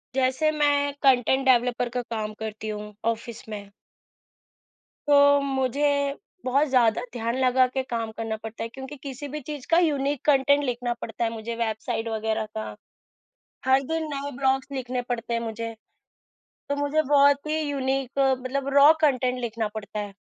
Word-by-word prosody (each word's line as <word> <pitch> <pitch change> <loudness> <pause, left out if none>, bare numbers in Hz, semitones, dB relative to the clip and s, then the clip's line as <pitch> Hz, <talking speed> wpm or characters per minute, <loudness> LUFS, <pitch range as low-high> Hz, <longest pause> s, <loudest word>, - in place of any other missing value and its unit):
जैसे 260 +4 +2
मैं 290 -1 +2
content 265 0 +3
developer 245 -1 +3
का 245 +1 -2
काम 220 -3 -4
करती 220 0 -5
हूँ, 210 0 -6 0.2
ऑफ़िस 230 0 -8
में। 205 -2 -7 1.4
तो 285 0 +6
मुझे 280 +1 0 0.3
बहुत 275 +4 +2
ज़्यादा 240 -4 +3
ध्यान 235 0 -2
लगा 255 0 +4
के 260 +1 -2
काम 230 -3 -3
करना 225 -1 -2
पड़ता 225 0 -6
है 230 - -4
क्योंकि 265 +4 -9
किसी 280 +1 -6
भी 300 +2 -5
चीज़ 290 -1 -7
का 330 - +5
यूनीक 290 -4 0
कॉन्टेंट 285 0 +4
लिखना 245 -2 -1
पड़ता 225 - -4
है 230 - +1
मुझे, 230 +1 -5
वेबसाइट 225 0 -2
वग़ैरह 220 0 -1
का। 215 - -5 0.9
हर 265 +1 +4
दिन 320 +4 -2
नए 280 +1 -4
ब्लॉग्स 265 0 +1
लिखने 255 -2 -3
पड़ते 235 -1 -2
हैं 230 - +1
मुझे। 230 0 -4 1.0
तो 285 - +1
मुझे 285 +2 +1
बहुत 285 0 +4
ही 310 +1 0
यूनीक 270 -2 -2
अ, 270 -1 +4
मतलब 260 +2 -3
रॉ 285 +2 +8
कॉन्टेंट 255 -4 +2
लिखना 230 -2 -2
पड़ता 210 0 -5
है। 205 -1 -5
260 Hz, 165 wpm, -25 LUFS, 230-280 Hz, 1.4 s, रॉ